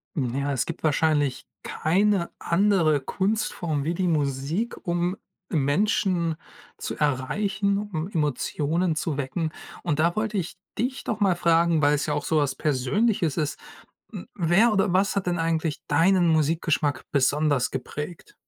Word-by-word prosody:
N 125 -6 -1
ja, 140 +1 -1
es 130 - 0
gibt 170 - -7
wahrscheinlich 150 -3 +1 0.2
keine 190 +2 +1
andere 170 -5 +2
Kunstform 180 - -1
wie 165 +4 -1
die 180 +1 -1
Musik, 150 - -1
um 175 +1 0 0.4
Menschen 170 +2 +1 0.4
zu - - -5
erreichen, 195 +9 0
um 190 -6 -3
Emotionen 155 - 0
zu 155 -2 -2
wecken. 150 +4 -2 0.3
Und 150 -4 -1
da 170 +2 +2
wollte 215 -1 -1
ich 180 0 -4 0.2
dich 260 +3 -2
doch 220 - -3
mal 190 -4 +3
fragen, 170 -1 +3
weil's 145 0 +2
ja 150 - -1
auch 145 -1 -2
so 160 -4 +1
was 140 -3 +1
Persönliches 155 - 0
ist, 150 -3 -2 0.5
hm, 85 - -7
wer 190 +6 +3
oder 195 -2 +2
was 195 +2 +2
hat 195 -2 -1
denn 175 -1 0
eigentlich 165 -1 -1
deinen 175 +4 +3
Musikgeschmack 155 -2 +1
besonders 145 -1 +2
geprägt? 150 - -6
165 Hz, 145 wpm, -25 LUFS, 145-190 Hz, 0.5 s, mal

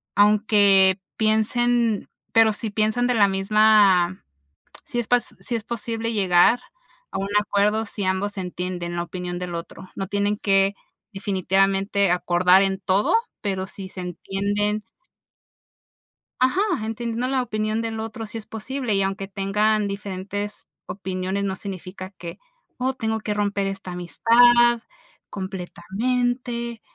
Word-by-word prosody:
aunque 205 -2 +5 0.2
piensen 225 +1 +2 0.3
pero 225 -1 +5
si 220 +1 -3
piensan 215 +3 +1
de 250 - +1
la 205 -3 +5
misma, 195 -2 +4 0.6
si 240 - -4
es 235 - -2
pas 245 -1 +1
si 245 - -4
es 220 - -6
posible 230 0 -3
llegar 190 +2 +4 0.5
a - - -3
un 195 - -2
acuerdo 210 +2 +1
si 205 0 -4
ambos 190 +2 -1
entienden 180 -1 -4
la 170 - -1
opinión 180 0 -5
del 180 -1 -5
otro, 170 +2 -8
no 195 -1 -3
tienen 205 +1 0
que 195 0 +2 0.4
definitivamente 195 0 +1
acordar 180 +1 +4
en 195 0 0
todo, 195 +1 +1 0.3
pero 190 -3 -2
si 190 -1 -7
se 185 - -8
entienden 200 +4 -2 1.6
ajá, 260 +10 +2 0.2
entendiendo 230 +2 -3
la 265 0 +1
opinión 215 -2 -2
del 225 -1 -4
otro 225 +1 -5
sí 215 +2 -7
es 215 - -8
posible, 245 +1 -3
y 195 - +2
aunque 195 0 -2
tengan 205 +2 +1
diferentes 200 +1 -5 0.2
opiniones 190 0 -3
no 190 -1 -2
significa 185 -1 -7
que: 170 -1 -8 0.4
"Oh 260 +1 0
tengo 220 -3 -2
que 210 - -2
romper 200 -1 -1
esta 195 -2 -5
amistad 240 +6 +4 0.5
completamente", 235 +6 -3
205 Hz, 135 wpm, -23 LUFS, 190-225 Hz, 1.6 s, aunque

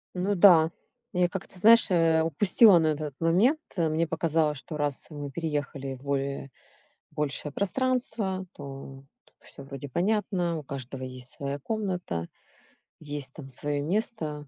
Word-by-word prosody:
Ну 190 +3 0
да, 170 -4 +7 0.4
я 180 -1 +3
как-то, 190 0 -7
знаешь, 225 +4 +6
э, 165 -2 +4
упустила 180 - +5
на 160 - +2
этот 150 -2 -2
момент, 190 - +3 0.2
э, 165 -4 +1
мне 160 +2 0
показалось, 160 -2 +1
что 150 +3 -7
раз 145 -2 -2
мы 145 -3 -6
переехали 145 -4 -3
в 130 - -16
более 140 -1 -2 0.6
большее 150 -1 -3
пространство, 210 - -1
то 135 -2 -9 0.2
то - - -29
всё 140 - -9
вроде 140 0 -8
понятно. 180 - 0
У 155 - -6
каждого 135 -1 -7
есть 130 -1 -6
своя 140 0 -4
комната, 180 - -3 0.7
есть 145 -3 -5
там 140 -4 -10
свое 145 +2 -3
место, 155 -5 -2
155 Hz, 145 wpm, -27 LUFS, 140-185 Hz, 0.7 s, да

